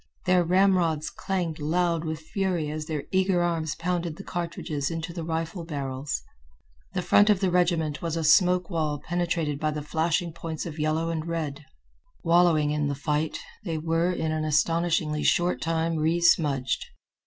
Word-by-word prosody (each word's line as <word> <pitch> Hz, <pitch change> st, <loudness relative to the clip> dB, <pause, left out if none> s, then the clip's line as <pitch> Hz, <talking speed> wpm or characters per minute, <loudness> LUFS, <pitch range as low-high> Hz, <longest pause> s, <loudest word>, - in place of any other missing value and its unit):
Their 180 Hz, -1 st, +4 dB
ramrods 175 Hz, -3 st, +2 dB
clanged 175 Hz, -5 st, -3 dB
loud 165 Hz, +2 st, 0 dB
with 160 Hz, 0 st, -3 dB
fury 175 Hz, -2 st, -1 dB
as 155 Hz, 0 st, -5 dB
their 155 Hz, -3 st, -3 dB
eager 185 Hz, -2 st, +2 dB
arms 165 Hz, -2 st, -1 dB
pounded 170 Hz, -1 st, -2 dB
the 195 Hz, -, -9 dB
cartridges 165 Hz, -5 st, -3 dB
into 165 Hz, 0 st, -4 dB
the 170 Hz, -1 st, -5 dB
rifle 165 Hz, +2 st, -3 dB
barrels. 135 Hz, -, -4 dB, 0.7 s
The 180 Hz, -, 0 dB
front 205 Hz, +4 st, +5 dB
of 205 Hz, -3 st, +4 dB
the 190 Hz, -2 st, +1 dB
regiment 165 Hz, -5 st, +1 dB
was 165 Hz, -1 st, -2 dB
a 165 Hz, -, -1 dB
smoke 180 Hz, +3 st, +4 dB
wall 155 Hz, -3 st, -1 dB
penetrated 170 Hz, -4 st, -1 dB
by 155 Hz, -, 0 dB
the 150 Hz, -1 st, -4 dB
flashing 165 Hz, +2 st, 0 dB
points 160 Hz, -1 st, -5 dB
of 160 Hz, -2 st, -7 dB
yellow 155 Hz, +2 st, 0 dB
and 160 Hz, 0 st, -3 dB
red. 155 Hz, -3 st, -3 dB, 0.6 s
Wallowing 165 Hz, -3 st, +4 dB
in 150 Hz, -1 st, 0 dB
the 140 Hz, -, -1 dB
fight, 150 Hz, +2 st, -1 dB, 0.3 s
they 165 Hz, -5 st, -2 dB
were 165 Hz, +3 st, +1 dB
in 160 Hz, -3 st, -1 dB
an 155 Hz, 0 st, -1 dB
astonishingly 155 Hz, 0 st, +1 dB
short 175 Hz, -7 st, +2 dB
time 165 Hz, 0 st, 0 dB
resmudged. 155 Hz, -5 st, +2 dB
165 Hz, 165 wpm, -26 LUFS, 155-175 Hz, 0.7 s, front